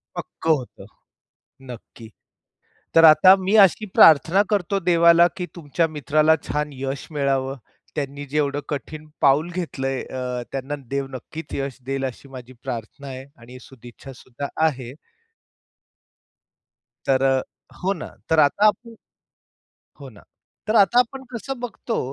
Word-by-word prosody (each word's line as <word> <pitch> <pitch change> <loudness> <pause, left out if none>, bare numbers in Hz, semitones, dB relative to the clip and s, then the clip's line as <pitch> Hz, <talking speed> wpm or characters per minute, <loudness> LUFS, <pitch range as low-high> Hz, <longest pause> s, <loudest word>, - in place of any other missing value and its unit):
पक्कं 160 - -3
होतं. 125 - -11 0.9
नक्की. 115 -1 -12 0.9
तर 165 0 +6
आता 160 +5 +8
मी 205 - +1
अशी 215 +4 0
प्रार्थना 165 +5 +6
करतो 200 -1 0
देवाला, 170 0 +6
की 180 -2 -4
तुमच्या 165 +1 -1
मित्राला 155 +3 +3
छान 150 0 -2
यश 135 0 -5
मिळावं. 135 -1 -1 0.4
त्यांनी 145 -1 -4
जेवढं 145 -1 0
कठीण 150 +2 -6
पाऊल 145 +5 +3
घेतलंय 135 -7 -3
अ, 125 -1 -5
त्यांना 135 +1 -4 0.2
देव 140 0 -2
नक्कीच 145 +4 -9
यश 135 -2 -4
देईल 135 0 -2
अशी 130 +2 -9
माझी 130 -1 -11
प्रार्थना 125 +2 -7
आहे 130 0 -8 0.2
आणि 125 +2 -12
सदिच्छा 130 +1 -13
सुद्धा 130 +3 -8 0.2
आहे. 130 -5 -4 2.2
तर 135 -1 +2
अ 135 -1 +2 0.4
हो 195 +2 +1
ना. 170 - -8 0.2
तर 160 - +3
आता 155 +8 +3
आपण 230 +2 -2 1.1
हो - - -9
ना, - - -17 0.5
तर 215 - -1
आता 210 +4 +5
आपण 265 +2 0
कसं 265 +3 -6
बघतो, 240 -1 -4
145 Hz, 135 wpm, -22 LUFS, 135-170 Hz, 2.2 s, आता